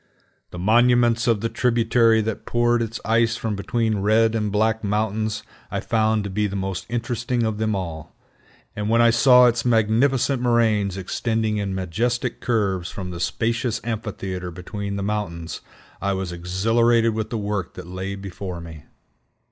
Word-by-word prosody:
The - - -9
monuments 120 +4 +3
of 115 -4 +2
the 115 - 0
tributary 115 -1 +3
that 110 0 -4
poured 120 0 +2
its 115 +1 -3
ice 115 0 +2
from 110 -3 -2
between 110 +1 -1
Red 110 +3 +3
and 105 -2 -1
Black 110 +2 +1
Mountains 105 +1 -1 0.3
I - - -2
found 110 -1 +1
to 100 - -4
be 105 +2 0
the 100 - -6
most 95 -2 -3
interesting 120 +1 -1
of 110 -1 -1
them 110 -1 0
all; 80 -5 -6 0.6
and 105 0 -2
when 115 +1 +3
I 120 0 +6
saw 125 +1 +6
its 120 -1 +2
magnificent 120 +3 +2
moraines 110 -5 +2
extending 110 +3 -1
in 100 -2 -2
majestic 110 +7 -2
curves 95 -7 0
from 90 -2 -6
the 85 - -6
spacious 115 +6 -1
amphitheater 95 -5 -4
between 100 +3 -5
the 100 - -3
mountains, 100 -5 -3 0.4
I 100 0 0
was 95 -2 -3
exhilarated 115 +7 +2
with 110 0 -3
the 115 - -3
work 100 -3 -3
that - - -8
lay 95 +2 -5
before 95 -2 -6
me. 80 -3 -10
110 Hz, 165 wpm, -23 LUFS, 100-115 Hz, 0.6 s, I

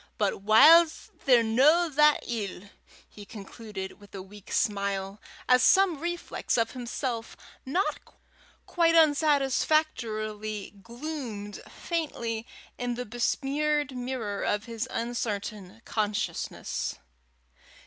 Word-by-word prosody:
But 200 -2 0
whiles 310 +11 +6
they're 250 -4 +6
no 285 +10 +4
that 300 0 +4
ill," 205 -4 -5 0.4
he 210 - -12
concluded, 205 -2 -8
with 205 -1 -15
a 195 - -5
weak 205 +1 -14
smile, 200 -1 -1 0.3
as 250 0 +5
some 380 -3 +4
reflex 345 -3 -3
of 230 -1 +1
himself 240 -2 -4 0.3
not 360 +9 0 0.7
quite 335 -1 +2
unsatisfactory 270 -9 +1
gloomed 235 -4 -6
faintly 235 -9 -4 0.3
in 245 -1 -2
the 250 +1 -5
besmeared 280 +4 -1
mirror 245 -5 -4
of 210 0 0
his 230 +1 -4
uncertain 220 -3 -4
consciousness. 210 -1 -2
235 Hz, 100 wpm, -28 LUFS, 210-295 Hz, 0.7 s, whiles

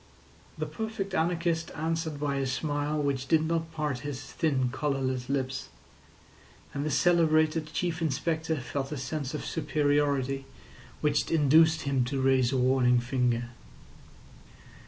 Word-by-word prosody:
The - - -2
perfect 220 -4 -4
anarchist 170 -1 0
answered 160 -1 -2
by 140 -1 -1
a 135 -1 0
smile 145 +2 -1
which 140 -2 -1
did 160 -1 +3
not 165 0 -1
part 150 -5 -2
his 145 0 -5
thin 135 -6 0
colourless 130 -2 -2
lips; 135 -1 -2 1.0
and 140 - -2
the 155 - -1
celebrated 155 -1 +3
Chief 175 -1 -2
Inspector 160 +1 0
felt 135 +3 -4
a 150 - -3
sense 140 +1 -4
of - - -5
superiority 145 -3 0 0.6
which 150 -1 +1
induced 160 +1 +4
him 135 -2 +1
to 135 +2 -2
raise 130 -2 +3
a 135 - +1
warning 125 -1 +3
finger. 120 -1 0
145 Hz, 135 wpm, -28 LUFS, 135-160 Hz, 1.0 s, induced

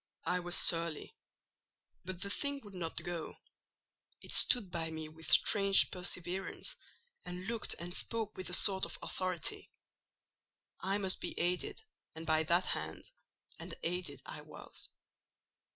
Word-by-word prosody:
I 180 - +1
was 175 0 +2
surly; 165 -2 +5 0.9
but 185 0 -6
the 200 - -3
thing 280 +4 -2
would 205 -2 -12
not 170 -3 -4
go: 175 -2 -5 0.8
it - - -8
stood 210 -7 +5
by 165 -2 -3
me 160 -1 -6
with 160 0 -8
strange 195 -2 +6
perseverance, 185 - -3 0.5
and 180 0 -6
looked 230 0 -1
and 175 +1 -6
spoke 220 +2 -1
with 185 - -6
a - - -4
sort 190 -1 +4
of - - -6
authority. 185 -4 -2 1.1
I 195 +1 -1
must 190 -2 +2
be - - -5
aided, 175 +1 -1 0.3
and 160 0 -7
by 160 0 +3
that 170 +3 +2
hand: - - -4 0.5
and - - -7
aided 175 -4 -3
I - - -8
was. - - -9
180 Hz, 140 wpm, -34 LUFS, 170-195 Hz, 1.1 s, strange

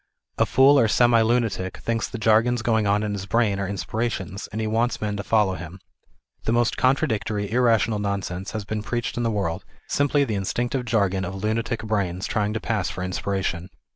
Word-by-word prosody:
A - - +4
fool 135 +3 +6
or 115 - +4
semi 120 +1 +4
lunatic 110 -5 0
thinks 115 -2 -2
the - - -5
jargons 110 +2 +3
going 110 -3 +2
on 105 +1 +2
in 105 -1 -2
his 100 -1 -5
brain 105 -2 +1
are 100 - -2
inspirations, 100 0 -3
and 110 - -4
he 110 - -1
wants 115 +3 0
men 105 -1 -2
to 100 - -4
follow 105 -3 +2
him. 85 +1 -8 0.7
The - - +1
most 120 0 +2
contradictory, 110 -5 0
irrational 115 -3 +2
nonsense 100 -2 -3
has 110 -2 -4
been 110 0 -3
preached 120 +2 -3
in 120 - -2
the 115 - +1
world, 95 -4 -2 0.2
simply 145 0 +2
the 120 -6 -2
instinctive 120 +6 -2
jargon 100 -5 +1
of 95 +1 -4
lunatic 115 +2 -1
brains 95 -4 -1
trying 105 -2 0
to 115 - -2
pass 110 -5 -1
for 90 - -5
inspiration. 90 -1 -2
110 Hz, 195 wpm, -24 LUFS, 100-115 Hz, 0.7 s, fool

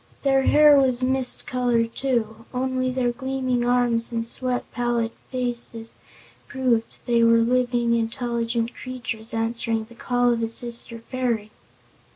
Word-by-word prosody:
Their 270 -1 +4
hair 295 -1 +7
was 255 -2 +2
mist 260 -1 -1
color, 245 -2 +1
too; 230 -2 -2
only 255 0 0
their 255 -1 0
gleaming 255 0 -1
arms 240 -1 +2
and 230 -1 -2
sweet, 250 +1 -2
pallid 240 -1 0 0.2
faces 240 -3 -3 0.5
proved 245 -4 0
they 235 -1 +3
were 230 0 +6
living, 240 0 +2
intelligent 235 0 -1
creatures 240 -3 -6
answering 225 0 -1
the 230 +2 -15
call 245 0 +1
of 230 - -2
a 225 - -1
sister 235 0 -2
fairy. 230 -3 -2
240 Hz, 135 wpm, -24 LUFS, 230-255 Hz, 0.5 s, hair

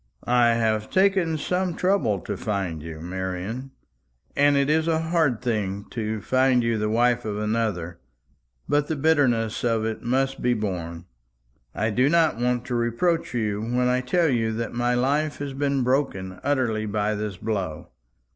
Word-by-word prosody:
"I 120 -1 +4
have 110 -2 0
taken 190 -4 +2
some 180 +2 -1
trouble 180 - +1
to 105 - -4
find 95 -6 -3
you, 80 0 -8
Marian, 95 +8 -4 0.7
and 145 0 +4
it 140 0 +2
is 160 +2 +2
a 165 -1 +2
hard 160 -7 +1
thing 100 -4 -2
to 110 -2 -3
find 130 +1 +3
you 115 -1 0
the 105 0 0
wife 120 +2 +2
of 105 -2 -3
another; 105 -6 -2 0.7
but 145 0 +1
the 160 - -1
bitterness 135 -7 +2
of 115 -2 +1
it 110 -1 -3
must 135 +2 0
be 125 0 +2
borne. 85 -5 -4 0.7
I 110 +2 0
do 125 +6 +3
not 165 -5 +3
want 125 0 0
to 125 - -4
reproach 120 +6 0
you 105 -3 -1
when 125 +2 0
I 125 0 +2
tell 160 +6 +2
you 115 -4 +1
that 115 0 -3
my 120 +1 +1
life 145 +4 +1
has 140 -1 -5
been 140 -1 0
broken 120 -8 -1
utterly 125 -6 0
by 105 0 0
this 105 -2 -4
blow. 100 -7 -3
120 Hz, 165 wpm, -24 LUFS, 105-140 Hz, 0.7 s, I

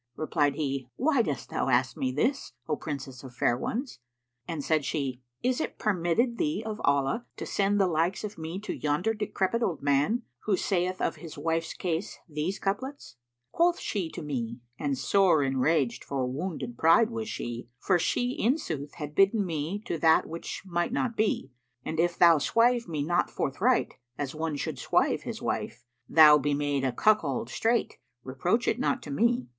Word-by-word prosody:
Replied 145 -3 +1
he, 135 -4 -3
"Why 280 -1 +3
dost 145 - -3
thou - - 0
ask 125 0 +2
me 130 - -1
this, 235 - -1
O 155 - +1
Princess 135 -4 -6
of 130 -2 -11
fair 120 -1 +2
ones?"; 245 - -4 0.5
and 160 -4 -4
said 155 -1 +1
she, 135 -3 -2 0.2
"Is 255 +3 +1
it - - -4
permitted 215 +5 +1
thee 155 +9 0
of 215 -1 -4
Allah 140 - +1
to - - -5
sell 200 0 +1
the 195 - +4
like 170 +3 0
of 210 -1 -5
me 165 +3 -5
to 215 - -4
yonder 155 +9 0
decrepit 210 +1 -1
old 175 -11 -1
man, 145 - +2 0.2
who 200 -3 +2
saith 185 0 0
of - - 0
his 165 -3 -10
wife's 165 +2 -1
case 175 +1 -3
these 155 +4 -2
couplets, 230 - -4 0.3
'Quoth 345 +1 +2
she 185 -6 -2
to 165 - -7
me,—and 125 0 -4
sore 185 -2 +3
enraged 135 0 +1
for 135 -2 -2
wounded 130 -2 -4
pride 215 +8 +5
was 225 -1 -4
she, 120 - -5
* - - -50
For 185 -3 +4
she 245 +8 0
in 255 +3 +1
sooth 145 - -5
had 150 -2 -6
bidden 195 +4 +4
me 170 +5 -3
to 170 -8 -3
that 160 +1 +5
which 165 +1 -6
might 175 0 -1
not 250 -2 -1
be,— 210 -11 0 0.3
'An 160 - -3
if 175 +1 +2
thou 170 -3 +7
swive 235 - +2
me 155 -4 -2
not 175 +3 +1
forthright, 215 - +1 0.2
as 140 -2 -3
one 160 -1 -2
should 145 - -3
swive - - +2
his - - -5
wife, 120 +1 -3
* - - -44
Thou 150 -2 +8
be 145 +1 0
made 145 -1 0
a 130 - +1
cuckold 215 - +1
straight, 230 +1 0 0.2
reproach 175 - 0
it - - +1
not 260 0 0
to 145 - -7
me. 235 - +2
165 Hz, 185 wpm, -28 LUFS, 140-215 Hz, 0.5 s, Thou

